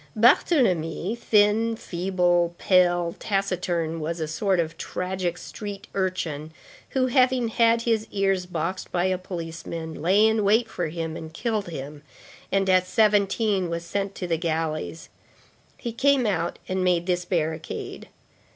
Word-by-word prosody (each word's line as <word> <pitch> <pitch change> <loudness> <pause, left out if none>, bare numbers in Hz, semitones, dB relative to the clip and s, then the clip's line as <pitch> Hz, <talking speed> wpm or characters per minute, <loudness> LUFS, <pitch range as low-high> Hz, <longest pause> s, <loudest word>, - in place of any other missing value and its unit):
Barthélemy, 215 - +3
thin, 225 0 +3
feeble, 175 -3 0
pale, 175 -2 +3
taciturn, 180 -5 -1
was 165 +2 -3
a 160 - -2
sort 190 +4 0
of 165 -1 -1
tragic 180 -1 -3
street 205 0 -7
urchin, 165 -5 -2 0.4
who, 260 -1 +1
having 255 -2 +3
had 230 0 +3
his 225 -2 +1
ears 195 -2 0
boxed 175 +2 -3
by 175 0 +1
a 185 -1 0
policeman, 165 -3 -6
lay 195 +6 +4
in 220 -1 +2
wait 220 +4 +3
for 175 -6 -3
him, 160 0 -4
and 160 -1 -8
killed 220 -5 -1
him, 145 -1 -7 0.5
and 195 0 +2
at 185 -1 +4
seventeen 205 -2 +2
was 170 0 -4
sent 195 +2 -3
to 180 - -4
the 170 -2 0
galleys. 155 - -3 0.7
He 235 - -4
came 275 +1 +3
out 175 -5 -1
and 185 0 -1
made 175 -2 +2
this 180 -1 0
barricade. 160 -3 -3
185 Hz, 140 wpm, -25 LUFS, 170-210 Hz, 0.7 s, lay